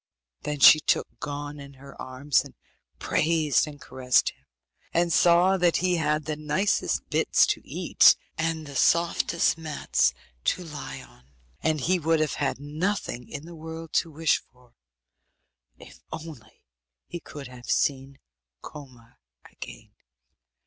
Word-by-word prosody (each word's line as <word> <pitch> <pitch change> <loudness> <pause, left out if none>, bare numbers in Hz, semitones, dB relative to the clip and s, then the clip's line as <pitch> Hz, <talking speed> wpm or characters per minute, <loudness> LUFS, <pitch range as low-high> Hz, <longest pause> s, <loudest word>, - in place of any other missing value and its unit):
Then 150 -1 -4
she 155 +4 +9
took - - +1
Gon 145 0 -6
in 140 0 -11
her 140 +1 -13
arms, 130 +2 0
and - - -14 0.4
praised 155 -2 +1
and 145 -1 -10
caressed 125 -2 +1
him, - - -31 0.5
and 170 0 +2
saw 175 +3 +5
that 175 -2 +3
he 180 -1 +1
had 150 -1 0
the 155 0 -2
nicest 155 +7 -1
bits - - +3
to - - -1
eat, - - +4 0.2
and 160 0 -2
the 140 -1 -10
softest 170 +3 +2
mats 145 - 0 0.3
to 180 - 0
lie 150 -4 -8
on; 60 - -20 0.4
and 155 -2 0
he 185 +6 +1
would 165 0 +1
have 155 -2 0
had 135 -2 -1
nothing 150 -3 -3
in 145 0 -7
the 170 - -10
world 160 0 -9
to 165 - +1
wish 160 0 +1
for 125 -1 -26 1.0
if - - -15
only 150 -9 -10 0.4
he 175 - -7
could 145 -3 -10
have 125 -1 -12
seen 135 -1 0 0.5
Koma 130 -6 -13 0.3
again. - - -11
150 Hz, 140 wpm, -26 LUFS, 140-165 Hz, 1.0 s, she